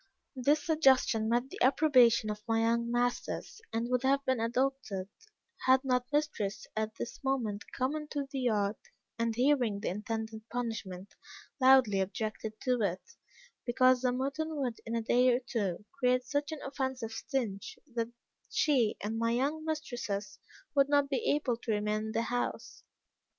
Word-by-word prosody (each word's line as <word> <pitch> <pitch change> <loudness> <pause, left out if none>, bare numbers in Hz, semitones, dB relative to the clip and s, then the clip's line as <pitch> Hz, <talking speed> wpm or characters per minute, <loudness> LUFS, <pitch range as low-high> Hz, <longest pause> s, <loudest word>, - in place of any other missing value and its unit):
This 290 +4 +2
suggestion 265 -8 +3
met 240 +3 0
the - - -9
approbation 250 -6 +5
of 210 0 -6
my 225 0 +2
young 235 +1 +1
masters, 245 - -2
and 230 +1 -1
would 250 -1 +2
have 275 +1 +2
been 260 -2 +1
adopted, 230 -5 -1 0.6
had 260 +1 +5
not 250 0 0
mistress 290 -9 -1
at 220 0 -2
this 240 - -7
moment 235 -7 -2
come 260 +4 -1
into 300 -2 -3
the 275 - -3
yard, 210 -4 +1 0.4
and 230 -1 0
hearing 245 -5 +2
the - - -2
intended 220 +2 -4
punishment, 220 -6 -4 0.5
loudly 260 -6 +6
objected 215 +2 -4
to 250 -3 +1
it, 195 - -2 0.5
because 255 +1 +4
the 250 -1 +2
mutton 275 +5 -2
would, 255 -6 -3
in 230 - -2
a 230 - -1
day 250 +2 +4
or - - 0
two, 205 -6 -3
create 250 -1 +3
such 285 +4 -1
an 315 - -6
offensive 265 -4 -3
stench, 225 -5 -3 0.2
that 230 -1 -1 0.4
she 255 -8 +2
and 220 +2 -2
my 230 0 +1
young 280 +7 0
mistresses 240 -10 -4 0.3
would 280 -1 +4
not 285 -1 +3
be 270 - 0
able 285 -5 +1
to 235 -1 -4
remain 210 0 0
in 220 - -4
the 230 - 0
house. 245 +1 -3
245 Hz, 160 wpm, -31 LUFS, 220-270 Hz, 0.6 s, loudly